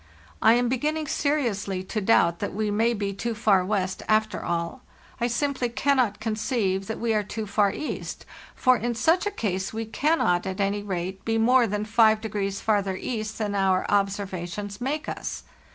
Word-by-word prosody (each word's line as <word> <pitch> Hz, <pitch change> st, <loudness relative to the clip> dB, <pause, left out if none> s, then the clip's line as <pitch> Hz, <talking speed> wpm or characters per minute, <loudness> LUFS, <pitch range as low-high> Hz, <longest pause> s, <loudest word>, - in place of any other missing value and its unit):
I 225 Hz, -, +6 dB
am 245 Hz, +1 st, +2 dB
beginning 300 Hz, +5 st, -1 dB
seriously 235 Hz, -11 st, -1 dB
to 215 Hz, +3 st, -3 dB
doubt 170 Hz, -5 st, +3 dB
that -, -, -4 dB
we 215 Hz, 0 st, 0 dB
may 225 Hz, +3 st, +2 dB
be 200 Hz, -1 st, -2 dB
too 230 Hz, +4 st, -3 dB
far 205 Hz, -4 st, +3 dB
west, 190 Hz, -1 st, -1 dB
after 215 Hz, -2 st, +1 dB
all. 170 Hz, +8 st, -2 dB, 0.4 s
I 240 Hz, -, +1 dB
simply 255 Hz, 0 st, -1 dB
can 270 Hz, +3 st, +1 dB
not 220 Hz, -5 st, +1 dB
conceive 215 Hz, -3 st, -1 dB
that 220 Hz, -, -3 dB
we 230 Hz, -1 st, +1 dB
are 215 Hz, -, +2 dB
too 215 Hz, +2 st, -5 dB
far 200 Hz, 0 st, +2 dB
east; 305 Hz, -, -5 dB, 0.3 s
for 255 Hz, -1 st, +4 dB
in 235 Hz, +1 st, -2 dB
such 330 Hz, -, +2 dB
a -, -, +2 dB
case 190 Hz, -, -2 dB
we 225 Hz, +1 st, -3 dB
cannot, 220 Hz, -, +1 dB
at 190 Hz, +1 st, -4 dB
any 200 Hz, +1 st, 0 dB
rate, 190 Hz, -1 st, -4 dB
be 225 Hz, 0 st, 0 dB
more 240 Hz, +2 st, +4 dB
than 210 Hz, +1 st, -2 dB
5° 215 Hz, -3 st, +2 dB
farther 200 Hz, -3 st, +1 dB
east 215 Hz, +1 st, -4 dB
than 210 Hz, -2 st, -2 dB
our 190 Hz, -2 st, +2 dB
observations* 200 Hz, 0 st, -2 dB
make 290 Hz, +4 st, -2 dB
us. -, -, -5 dB
215 Hz, 180 wpm, -25 LUFS, 195-235 Hz, 0.4 s, I